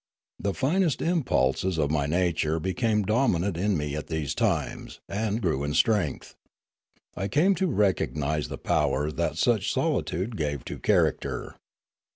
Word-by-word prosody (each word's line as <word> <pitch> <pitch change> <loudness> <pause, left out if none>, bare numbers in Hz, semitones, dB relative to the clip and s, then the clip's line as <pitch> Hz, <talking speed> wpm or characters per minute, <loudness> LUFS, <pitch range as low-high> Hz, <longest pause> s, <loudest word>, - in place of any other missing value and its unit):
The 100 -1 -2
finest 160 +1 +1
impulses 95 - +1
of 75 -2 +1
my 75 -2 +1
nature 80 -1 +1
became 105 +5 0
dominant 100 -4 +1
in 95 +2 +1
me 75 -1 -3
at 75 - -5
these 80 -3 -2
times - - -2
and 105 +2 -1
grew 80 - 0
in 75 +1 -2
strength. 95 - +1 0.8
I 95 - -2
cams 170 - +2
to 190 - +2
recognise 80 - 0
the - - -6
power 75 +3 0
that - - -2
such - - +2
solitude 95 +8 -1
gave 75 -5 -2
to - - -6
character. - - 0
90 Hz, 145 wpm, -26 LUFS, 75-110 Hz, 0.8 s, cams